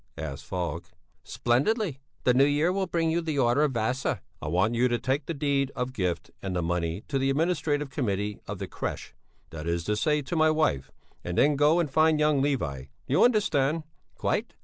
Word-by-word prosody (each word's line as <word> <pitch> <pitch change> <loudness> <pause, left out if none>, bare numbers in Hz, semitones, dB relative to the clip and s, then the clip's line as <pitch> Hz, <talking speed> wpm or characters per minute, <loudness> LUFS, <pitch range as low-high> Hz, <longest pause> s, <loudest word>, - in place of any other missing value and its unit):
asked 80 -4 -6
Falk. 90 -4 -3 0.4
"Splendidly! 145 - 0 0.2
The 125 - +4
new 130 +2 +5
year 145 +4 +2
will 190 0 -1
bring 165 -1 0
you 170 +1 +1
the 160 -3 -3
order 120 +1 +3
of 150 -3 +2
Vasa!" 120 +3 -1 0.2
"I - - -5
want 95 +9 +2
you 120 +2 +3
to 120 -1 +1
take 135 +5 -1
the 170 - -2
deed 140 -2 0
of 125 0 -3
gift 90 -7 -2
and 95 -2 -3
the 90 - 0
money 85 +2 -2
to 135 - -1
the 135 +1 +1
Administrative 150 -2 0
Committee 105 -6 -2
of - - -4
the - - -5
crèche, - - -5 0.4
that 80 0 -6
is 85 0 -1
to 105 +4 0
say, 150 +6 +1
to 135 - -4
my 155 -1 +4
wife, 155 - +1 0.3
and 85 0 -4
then 150 0 +4
go 150 +4 +4
and 170 - +1
find 155 +1 +4
young 150 -2 +3
Levi. 80 - -1
Do - - -23 0.2
you 140 - +4
understand?" 165 - +2 0.3
"Quite." - - -2
135 Hz, 205 wpm, -27 LUFS, 105-155 Hz, 0.4 s, new